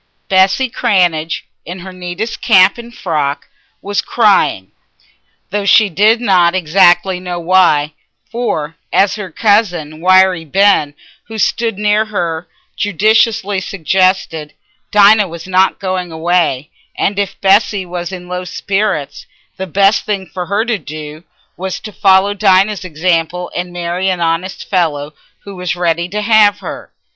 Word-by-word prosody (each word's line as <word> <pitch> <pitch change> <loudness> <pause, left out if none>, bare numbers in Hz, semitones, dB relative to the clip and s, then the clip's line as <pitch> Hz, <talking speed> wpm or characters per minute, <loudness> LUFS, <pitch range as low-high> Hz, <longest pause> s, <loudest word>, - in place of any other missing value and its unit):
Bessy 190 +7 +3
Cranage, 175 -8 0 0.2
in 175 +2 -8
her 190 +1 -9
neatest 180 +5 -6
cap 195 -1 +4
and 235 0 -10
frock, 150 -10 -3 0.4
was 205 0 -1
crying, 200 - +1 0.8
though 205 0 -1
she 205 +1 +4
did 210 +6 +3
not 185 -6 +2
exactly 180 +1 +3
know 180 -1 -5
why; 165 -4 +2 0.4
for, 165 -10 -3
as 195 -1 +2
her 205 -3 -6
cousin 175 -6 0
Wiry 185 -1 +4
Ben, 165 -3 +2 0.3
who 225 0 -9
stood 225 -1 -1
near 210 +1 +1
her, 175 -6 -3 0.3
judiciously 205 0 +1
suggested, 185 -4 -1 0.3
Dinah 210 0 +5
was 170 -1 -9
not 190 +1 +2
going 185 -2 -3
away, 160 -4 -1 0.3
and 200 0 -1
if 200 -2 -3
Bessy 200 0 +2
was 175 0 -6
in 180 -1 -8
low 180 0 -4
spirits, 180 -6 -3 0.3
the 190 - -5
best 195 +4 +2
thing 200 -3 -3
for 180 -1 -7
her 205 +3 0
to 230 -4 -1
do 155 +1 -9 0.3
was 190 +1 -4
to 215 - -9
follow 195 0 +3
Dinah's 200 0 +2
example 175 +1 -2
and 175 0 -4
marry 175 +2 -2
an 185 -2 -1
honest 170 +3 -2
fellow 155 -5 -1 0.3
who 200 -1 -10
was 180 -1 -3
ready 170 0 -1
to 210 +2 -3
have 210 -2 +4
her. - - -9
185 Hz, 140 wpm, -14 LUFS, 170-205 Hz, 0.8 s, Dinah